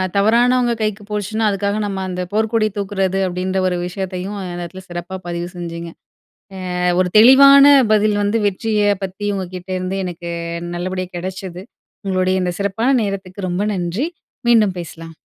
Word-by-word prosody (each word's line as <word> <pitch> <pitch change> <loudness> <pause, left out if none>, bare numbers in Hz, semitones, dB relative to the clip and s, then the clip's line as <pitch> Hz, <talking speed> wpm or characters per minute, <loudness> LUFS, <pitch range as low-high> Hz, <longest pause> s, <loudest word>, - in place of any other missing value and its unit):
தவறானவங்க 240 +4 +3
கைக்கு 215 -1 -2
போச்சுனா, 210 +1 -2
அதுக்காக 200 +1 -1
நம்ம 195 -1 -3
அந்த 180 0 -3
போர்க்கொடி 220 0 +1
தூக்குறது 195 -1 -1
அப்டீன்ற 185 +1 -2
ஒரு 180 -1 0
விஷயத்தையும், 190 +2 -5
இந்த 180 -1 -5
நேரத்தில 185 +2 -8
சிறப்பா 175 +2 -6
பதிவு 175 0 -4
செஞ்சிங்க. 170 -1 -6 0.9
அ - - -2 0.2
ஒரு 180 - 0
தெளிவான 275 +4 +8 0.2
பதில் 210 0 +3
வந்து 205 +3 +1
வெற்றிய 205 +1 +1
பத்தி 195 +2 -4
உங்ககிட்ட 185 -1 -6
இருந்து 185 +1 -3
எனக்கு 170 -1 -6 0.4
நல்லபடியா 185 +1 -3
கிடைச்சது. 185 0 -6 0.4
உங்களுடைய 185 0 +1
இந்த 180 -1 -1
சிறப்பான 200 +5 0
நேரத்துக்கு 195 -1 -4
ரொம்ப 180 +4 -1
நன்றி. 180 - -2 0.4
மீண்டும் 215 -5 +4
பேசலாம். 165 -1 -9
190 Hz, 140 wpm, -19 LUFS, 180-210 Hz, 0.9 s, தெளிவான